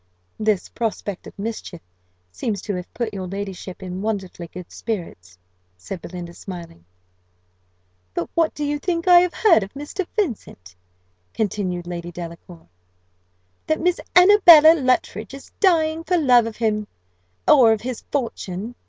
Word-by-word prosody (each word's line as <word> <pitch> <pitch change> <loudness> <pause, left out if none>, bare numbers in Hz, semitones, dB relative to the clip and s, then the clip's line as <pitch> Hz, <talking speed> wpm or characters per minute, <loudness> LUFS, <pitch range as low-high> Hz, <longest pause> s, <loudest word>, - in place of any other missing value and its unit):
"This 215 -3 +1
prospect 210 -4 -4
of - - -13
mischief 200 -4 -5 0.5
seems 200 - -3
to 205 - -3
have 180 -1 -6
put 230 -3 -4
your 190 -2 -5
ladyship 195 -1 -6
in 185 0 -5
wonderfully 195 -5 -4
good 180 +1 -10
spirits," 165 - -6 0.4
said 160 - -7
Belinda, 175 -1 -8
smiling. 170 - -10 1.3
"But 170 - -2
what 330 -1 +1
do 295 - -3
you 290 0 -1
think 335 +1 -2
I 355 -1 +9
have 360 0 0
heard 385 - +5
of 195 0 -6
Mr. 315 +6 -5
Vincent?" 220 - -4 0.6
continued 185 -4 -2
Lady 175 0 -6
Delacour: 170 0 -10 1.0
"that 315 - +1
Miss 360 0 +1 0.2
Annabella 355 -4 +9
Luttridge 255 -3 -1
is 275 - -13
dying 325 -4 +2
for 360 +1 +1
love 250 -7 +4
of 225 - -7
him 215 -2 -1 0.6
or 255 -7 +7
of 220 -1 0
his 250 -1 -5
fortune. 230 -5 -3
215 Hz, 145 wpm, -22 LUFS, 180-295 Hz, 1.3 s, I